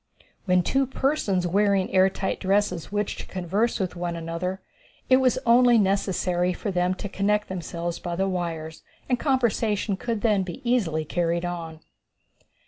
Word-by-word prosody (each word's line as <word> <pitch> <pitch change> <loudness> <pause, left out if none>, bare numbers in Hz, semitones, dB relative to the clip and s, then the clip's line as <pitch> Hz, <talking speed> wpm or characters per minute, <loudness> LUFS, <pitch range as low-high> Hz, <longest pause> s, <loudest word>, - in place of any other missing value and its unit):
When 180 -2 +3
two 270 +7 +1
persons 260 -10 0
wearing 200 +1 +2
the - - -10
air 190 0 +5
tight 190 0 -3
dresses 195 -3 0
wished 205 0 -2
to - - -7
converse 195 +7 -1
with 185 -2 -2
one 175 -1 -3
another 170 +3 -4 0.5
it 255 - +8
was 260 -2 +2
only 240 0 +6
necessary 190 -3 +1
for 200 +3 -4
them 180 0 +1
to 205 - -5
connect 210 +2 0
themselves 170 -1 -4
by 175 -1 -4
the 190 +2 0
wires, 165 -4 -4 0.3
and 250 -2 +1
conversation 225 -6 +1
could 230 +1 -3
then 210 -4 +3
be 180 -3 -6
easily 170 -11 +1
carried 170 +2 -1
on. 165 -2 -5
190 Hz, 160 wpm, -25 LUFS, 175-210 Hz, 0.5 s, it